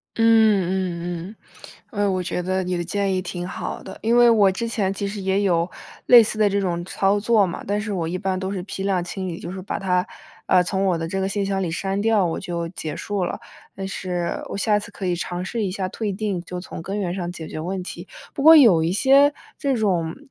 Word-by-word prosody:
嗯 190 Hz, -5 st, +2 dB
嗯 -, -, -25 dB, 0.6 s
嗯， 205 Hz, -2 st, -2 dB
呃， 195 Hz, -, +2 dB
我 185 Hz, -1 st, -1 dB
觉 180 Hz, -, -2 dB
得 185 Hz, +1 st, -1 dB
你 180 Hz, 0 st, -2 dB
的 175 Hz, -, -2 dB
建 195 Hz, +2 st, -1 dB
议 185 Hz, -, 0 dB
挺 180 Hz, 0 st, -5 dB
好 -, -, -5 dB
的。 190 Hz, -, -10 dB
因 235 Hz, +2 st, +2 dB
为 240 Hz, 0 st, +7 dB
我 205 Hz, -4 st, +5 dB
之 230 Hz, +5 st, -3 dB
前 200 Hz, -4 st, -1 dB
其 200 Hz, 0 st, -3 dB
实 200 Hz, 0 st, -5 dB
也 190 Hz, +1 st, +1 dB
有 175 Hz, -2 st, +1 dB, 0.4 s
类 240 Hz, -2 st, +9 dB
似 215 Hz, 0 st, -4 dB
的 210 Hz, -1 st, +4 dB
这 200 Hz, +1 st, 0 dB
种 175 Hz, -3 st, -1 dB
操 195 Hz, +2 st, +1 dB
作 215 Hz, -1 st, +3 dB
嘛， 175 Hz, -, -5 dB
但 205 Hz, +1 st, 0 dB
是 210 Hz, -1 st, -3 dB
我 170 Hz, -3 st, -2 dB
一 180 Hz, +2 st, -2 dB
般 190 Hz, -1 st, -2 dB
都 190 Hz, +1 st, -3 dB
是 185 Hz, -3 st, -4 dB
批 195 Hz, 0 st, -6 dB
量 190 Hz, -3 st, +1 dB
清 185 Hz, +1 st, -5 dB
理。 170 Hz, -1 st, -5 dB
就 170 Hz, -, -7 dB
是 190 Hz, 0 st, -6 dB
把 195 Hz, -, -4 dB
它， 180 Hz, -1 st, 0 dB, 0.4 s
呃， 180 Hz, -1 st, +5 dB
从 190 Hz, +2 st, -1 dB
我 180 Hz, -3 st, +2 dB
的 165 Hz, 0 st, -3 dB
这 195 Hz, +3 st, -3 dB
个 190 Hz, -, 0 dB
信 200 Hz, 0 st, -1 dB
箱 195 Hz, -1 st, -1 dB
里 175 Hz, -, -1 dB
删 195 Hz, +4 st, -2 dB
掉， 215 Hz, -3 st, +3 dB
我 165 Hz, -, -2 dB
就 170 Hz, -2 st, -4 dB
结 155 Hz, -4 st, -6 dB
束 200 Hz, -3 st, -2 dB
了。 -, -, -4 dB, 0.4 s
但 195 Hz, 0 st, -5 dB
是 180 Hz, -2 st, -3 dB
我 -, -, -4 dB
下 210 Hz, +1 st, +2 dB
次 210 Hz, -, -10 dB
可 195 Hz, -, -6 dB
以 175 Hz, -1 st, +1 dB
尝 175 Hz, +1 st, -4 dB
试 225 Hz, +1 st, -2 dB
一 190 Hz, -, -1 dB
下 190 Hz, -1 st, -2 dB
退 210 Hz, +1 st, -3 dB
订， 195 Hz, -3 st, -2 dB
就 180 Hz, 0 st, -6 dB
从 180 Hz, -, -8 dB
根 195 Hz, +4 st, -4 dB
源 180 Hz, -3 st, -2 dB
上 175 Hz, -2 st, -3 dB
解 160 Hz, -3 st, -8 dB
决 155 Hz, -, -6 dB
问 185 Hz, +3 st, -3 dB
题。 -, -, -8 dB, 0.3 s
不 275 Hz, -, -4 dB
过 320 Hz, +2 st, +9 dB
有 205 Hz, -, +7 dB
一 165 Hz, -, 0 dB
些 275 Hz, +7 st, +5 dB, 0.3 s
这 280 Hz, -3 st, +1 dB
种 180 Hz, -8 st, 0 dB
190 Hz, 270 characters per minute, -22 LUFS, 180-205 Hz, 0.6 s, 类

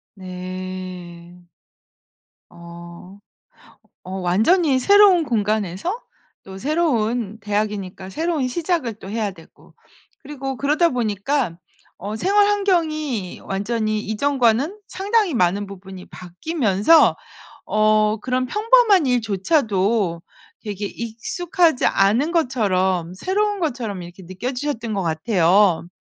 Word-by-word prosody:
네. 185 Hz, -2 st, -8 dB, 1.1 s
어. 170 Hz, +2 st, -12 dB, 0.9 s
어 -, -, -8 dB
완전히 260 Hz, -, +3 dB
새로운 395 Hz, +3 st, +5 dB
공간에서 215 Hz, -, -1 dB, 0.4 s
또 190 Hz, 0 st, -10 dB
새로운 240 Hz, -, 0 dB
대학이니까 205 Hz, -2 st, -3 dB
새로운 315 Hz, -, -1 dB
시작을 315 Hz, -, -1 dB
또 190 Hz, -, -10 dB
해야 215 Hz, 0 st, -2 dB
되고 165 Hz, -4 st, -18 dB, 0.4 s
그리고 270 Hz, -2 st, -6 dB
그러다 305 Hz, +4 st, +2 dB
보니까 225 Hz, -, -1 dB, 0.4 s
어 205 Hz, +3 st, -6 dB
생활 405 Hz, -, +3 dB
환경이 310 Hz, -, -1 dB
완전히 215 Hz, +2 st, -2 dB
이전과는 255 Hz, -, +1 dB
상당히 405 Hz, 0 st, 0 dB
많은 200 Hz, -3 st, +1 dB
부분이 190 Hz, -1 st, -10 dB
바뀌면서 210 Hz, -, +2 dB, 0.5 s
어 215 Hz, 0 st, +2 dB
그런 255 Hz, +1 st, -1 dB
평범한 425 Hz, -, +4 dB
일조차도 210 Hz, -, 0 dB, 0.4 s
되게 205 Hz, -1 st, -5 dB
익숙하지 260 Hz, -, -1 dB
않은 225 Hz, +11 st, +2 dB
것처럼, 190 Hz, -, 0 dB
새로운 405 Hz, -, -1 dB
것처럼 240 Hz, -, -3 dB
이렇게 175 Hz, +2 st, -11 dB
느껴지셨던 235 Hz, -, -4 dB
것 195 Hz, -, -1 dB
같아요. 170 Hz, +1 st, +2 dB
220 Hz, 245 characters per minute, -21 LUFS, 190-300 Hz, 1.1 s, 새로운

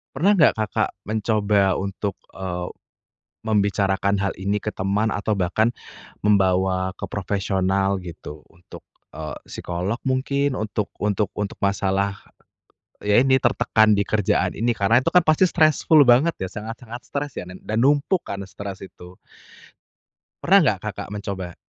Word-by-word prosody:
pernah 190 Hz, +5 st, +3 dB
nggak 155 Hz, -, +6 dB
Kakak 110 Hz, -3 st, -1 dB, 0.2 s
mencoba 105 Hz, -3 st, +2 dB
untuk, 100 Hz, 0 st, -3 dB, 0.2 s
eee, 90 Hz, -2 st, -4 dB, 0.7 s
membicarakan 100 Hz, -2 st, +1 dB
hal 100 Hz, -, 0 dB
ini 100 Hz, +1 st, -1 dB
ke 105 Hz, -, -2 dB
teman, 100 Hz, +3 st, -1 dB
atau 105 Hz, +1 st, -1 dB
bahkan, 105 Hz, +5 st, +1 dB, 0.5 s
membawa 95 Hz, -2 st, +2 dB
ke -, -, -21 dB
profesional 95 Hz, 0 st, 0 dB
gitu, 80 Hz, -4 st, -10 dB
untuk, 85 Hz, 0 st, -15 dB, 0.2 s
eee, 75 Hz, 0 st, -6 dB
psikolog 90 Hz, +7 st, -4 dB
mungkin 140 Hz, +1 st, 0 dB
untuk 105 Hz, -2 st, -2 dB, 0.2 s
untuk 105 Hz, 0 st, 0 dB
untuk 105 Hz, -1 st, -4 dB
masalah, 100 Hz, 0 st, 0 dB, 0.9 s
ya 105 Hz, +2 st, +4 dB
ini 130 Hz, +1 st, +4 dB
tertekan 110 Hz, -3 st, +3 dB
di 100 Hz, -1 st, +2 dB
kerjaan 105 Hz, -3 st, +1 dB
ini 120 Hz, +3 st, +1 dB
karena 115 Hz, +3 st, +2 dB
itu 165 Hz, -, 0 dB
kan 180 Hz, -, +7 dB
pasti 155 Hz, +3 st, +3 dB
stressful 155 Hz, -1 st, +4 dB
banget 130 Hz, +8 st, +5 dB
ya 95 Hz, -, -3 dB
sangat-sangat 115 Hz, +4 st, -8 dB
stres 145 Hz, 0 st, -4 dB
ya -, -, -5 dB
dan 90 Hz, +1 st, -11 dB
dan 110 Hz, -, -4 dB
numpuk 145 Hz, +6 st, +2 dB
karena 100 Hz, -1 st, -6 dB
stres 100 Hz, 0 st, -8 dB
itu. 90 Hz, -1 st, -13 dB, 1.3 s
Pernah 195 Hz, +3 st, +6 dB
nggak 105 Hz, -9 st, +2 dB
Kakak 105 Hz, -2 st, -5 dB
mencoba? 95 Hz, -4 st, -5 dB
100 Hz, 140 wpm, -22 LUFS, 95-115 Hz, 1.3 s, kan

